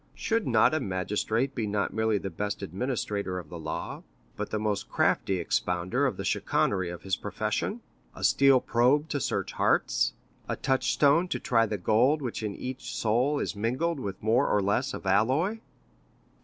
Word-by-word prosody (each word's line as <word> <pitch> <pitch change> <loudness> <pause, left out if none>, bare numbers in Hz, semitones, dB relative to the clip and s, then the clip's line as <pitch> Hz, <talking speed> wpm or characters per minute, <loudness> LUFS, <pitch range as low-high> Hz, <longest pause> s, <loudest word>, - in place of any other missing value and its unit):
Should 225 -1 -1
not - - +4
a 155 - +2
magistrate 105 - -1
be 115 -5 -2
not 100 -1 -1
merely 110 -1 +1
the 95 -1 -5
best 105 -1 -3
administrator 100 -1 -2
of 90 - -7
the 85 - -7
law, 80 0 -5 0.3
but - - -4
the - - -1
most 105 -1 -2
crafty 95 - +1
expounder 90 0 0
of - - -3
the - - -4
chicanery 95 -3 0
of 90 -1 -8
his 95 0 0
profession, 110 - -3 0.3
a - - -8
steel 135 -1 +5
probe 135 +6 +2
to 145 - -1
search - - -2
hearts, - - +1 0.4
a - - 0
touchstone 140 +5 +2
to - - -2
try 115 -2 +2
the 105 - -2
gold 120 - +3
which 120 -3 -3
in 105 -2 -3
each 130 +1 -6
soul 125 +7 +1
is - - -2
mingled 130 +10 -1
with 100 -6 -6
more 115 +6 +3
or 105 - +2
less 100 +1 0
of - - -9
alloy?" 130 - +2
110 Hz, 175 wpm, -28 LUFS, 100-135 Hz, 0.4 s, steel